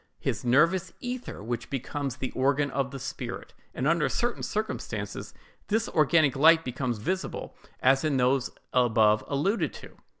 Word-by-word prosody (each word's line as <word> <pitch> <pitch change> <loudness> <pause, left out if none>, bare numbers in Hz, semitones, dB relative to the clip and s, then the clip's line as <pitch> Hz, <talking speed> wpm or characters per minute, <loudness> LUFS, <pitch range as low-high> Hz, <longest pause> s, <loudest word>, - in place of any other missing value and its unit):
his - - -2
nervous 170 +9 +3
ether, 245 - -5
which 120 +1 -4
becomes 135 0 -3
the 130 - -4
organ 140 +2 +1
of 135 -1 -1
the 135 - -7
spirit;" 130 - -6 0.2
and 130 - -2
under 165 -1 +2
certain 240 0 -1
circumstances 215 +1 -4 0.4
this 220 +1 +1
organic 155 -2 +3
light 160 +3 +6
becomes 125 -1 -2
visible, 185 - -3 0.3
as 135 +2 +4
in 150 -3 +1
those 125 0 +2 0.2
above 110 -4 +4
alluded 160 +11 0
to. - - -12
140 Hz, 145 wpm, -27 LUFS, 125-170 Hz, 0.4 s, light